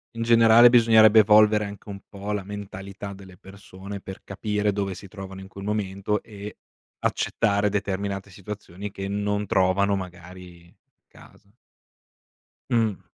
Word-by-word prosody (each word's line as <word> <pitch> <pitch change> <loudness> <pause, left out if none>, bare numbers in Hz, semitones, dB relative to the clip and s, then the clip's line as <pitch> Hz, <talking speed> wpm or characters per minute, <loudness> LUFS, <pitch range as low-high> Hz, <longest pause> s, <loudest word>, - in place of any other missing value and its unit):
In 115 - -3
generale, 115 +1 +7
bisognerebbe 110 -2 +6
evolvere 105 0 +5
anche 100 +1 -10
un 100 -1 -7
po' 100 +1 -6
la 105 -2 -2
mentalità 100 0 -8
delle 95 -2 -14
persone 100 0 -10
per 95 0 -10
capire 105 +1 -2
dove 100 -2 -3
si 100 - -11
trovano 95 -1 -9
in 95 - -10
quel 100 0 -11
momento 105 0 -2
e 105 -2 -10 0.4
accettare 105 -2 0
determinate 100 0 -3
situazioni 100 0 -8
che 95 0 -6
non 105 +1 -2
trovano, 100 +2 +2
magari, 90 -1 -10 0.3
casa. 100 0 -19 1.2
Mh. 115 -5 +1
100 Hz, 130 wpm, -24 LUFS, 95-105 Hz, 1.2 s, generale